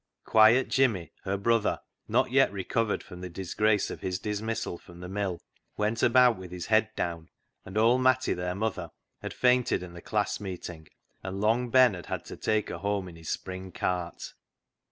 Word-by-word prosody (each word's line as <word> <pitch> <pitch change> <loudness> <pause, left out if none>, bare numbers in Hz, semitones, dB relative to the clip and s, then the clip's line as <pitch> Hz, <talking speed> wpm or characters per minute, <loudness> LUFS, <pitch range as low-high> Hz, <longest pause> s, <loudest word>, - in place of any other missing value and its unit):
Quiet 110 +4 +6
Jimmy, 115 -11 +1
her 100 0 0
brother, 115 +2 +1 0.3
not - - +2
yet 135 -3 +4
recovered 100 +3 -1
from 90 -2 -11
the 90 - -5
disgrace 100 +4 0
of - - -7
his 90 -1 -2
dismissal 105 -2 -3
from 85 0 -15
the 90 - -7
mill, 95 -2 -2 0.4
went 105 +2 0
about 125 -1 +5
with 95 -1 -9
his 90 0 -6
head 110 0 +3
down, 85 -2 -3 0.4
and 95 +3 -6
old 120 +4 +4
Matty, 130 0 +3
their 90 0 -3
mother, 100 -5 -2 0.3
had - - -5
fainted 125 -6 +2
in 90 -1 -9
the 85 - -10
class 105 -1 -1
meeting, 90 -5 -7 0.3
and 95 +1 -5
Long 115 +4 +2
Ben 130 -2 +6
had 90 -2 -8
had - - -4
to - - -8
take 110 -1 0
her - - -5
home 100 -1 -1
in 85 - -12
his 80 -1 -9
spring 95 0 -5
cart. 90 -1 -3
100 Hz, 185 wpm, -28 LUFS, 90-115 Hz, 0.4 s, Quiet